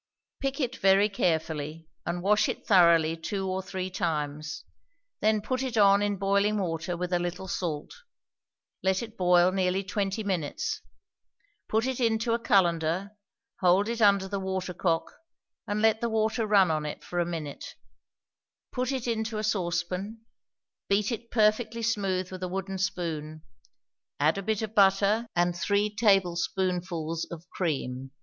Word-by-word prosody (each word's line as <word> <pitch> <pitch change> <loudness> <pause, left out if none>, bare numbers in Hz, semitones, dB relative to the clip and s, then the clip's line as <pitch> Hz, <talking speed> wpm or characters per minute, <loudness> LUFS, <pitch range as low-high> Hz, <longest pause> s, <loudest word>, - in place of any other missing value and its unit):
Pick 275 +1 -2
it 255 -3 -2
very 195 +2 +4
carefully, 160 -4 -2 0.2
and 175 +1 -2
wash 210 +2 +3
it - - -5
thoroughly 170 -4 +5
two 190 +4 -3
or 185 0 -1
three 185 0 -5
times; 155 -5 -3 0.5
then 215 0 +2
put 255 +2 -1
it 255 -4 -3
on 200 -1 +6
in 205 -1 0
boiling 200 +2 +2
water 170 -2 -2
with 180 +1 -3
a 175 - +3
little 175 +2 -4
salt; 165 -5 -3 0.9
let 190 +2 +1
it 220 -1 -9
boil 180 -2 +4
nearly 190 0 0
twenty 200 +2 -2
minutes. 180 -7 -2 0.9
Put 220 +2 +1
it 260 -1 -2
into 230 -1 +1
a 235 - +1
cullender; 180 -3 +2 0.5
hold 185 +2 +4
it 235 0 -3
under 200 -2 +4
the 200 0 -3
watercock, 185 -3 -1 0.6
and 210 +1 -1
let 220 +1 +3
the 235 - 0
water 220 0 0
run 195 -5 +5
on 155 -1 -1
it 150 - -6
for 175 - -3
a - - +3
minute. 160 -4 -6 1.0
Put 255 +1 -1
it 260 -3 -3
into 220 -2 -2
a 215 - -2
saucepan; 185 +2 -2 0.6
beat 200 +3 +2
it 230 0 -5
perfectly 225 +1 +1
smooth 195 -5 -1
with 185 -1 -7
a 185 - -2
wooden 190 +1 -4
spoon; 155 -4 -3 0.8
add 155 +6 +2
a - - -3
bit 220 +2 -1
of 215 -1 -5
butter, 200 +3 +4
and 175 0 +2
three 205 +3 0
tablespoonfuls 180 -4 0
of 170 0 -9
cream. 135 -6 -3
190 Hz, 155 wpm, -28 LUFS, 175-215 Hz, 1.0 s, on